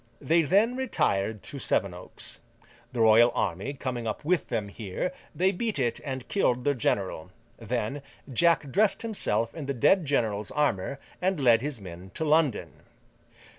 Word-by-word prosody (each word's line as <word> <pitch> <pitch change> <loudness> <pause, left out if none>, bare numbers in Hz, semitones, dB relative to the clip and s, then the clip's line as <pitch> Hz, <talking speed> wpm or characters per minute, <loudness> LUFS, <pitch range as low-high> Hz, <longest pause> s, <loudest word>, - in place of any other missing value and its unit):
They 165 +1 +3
then 205 - +3
retired 110 - 0
to 140 - -7
Sevenoaks. 90 -7 -2 0.5
The 120 -3 -2
royal 115 +2 +6
army 95 +12 -1
coming 125 -3 -4
up 110 +6 -4
with 175 -1 +1
them 110 -4 -1
here, 105 - -4 0.2
they 185 +2 +3
beat 215 +1 -2
it 120 -4 0
and 130 -3 -5
killed 125 -11 +1
their 145 - +2
general. 95 - -1 0.3
Then, 120 +4 -3 0.3
Jack 160 0 +3
dressed 210 - +2
himself 115 - 0
in 155 -4 -6
the 140 - -2
dead 175 - +4
general's 110 -7 0
armour, 140 -4 0 0.2
and 185 -2 +1
led 120 -4 +5
his 140 -3 -3
men 90 -1 -10
to 160 - -1
London. 150 -6 +2
130 Hz, 155 wpm, -27 LUFS, 110-160 Hz, 0.5 s, royal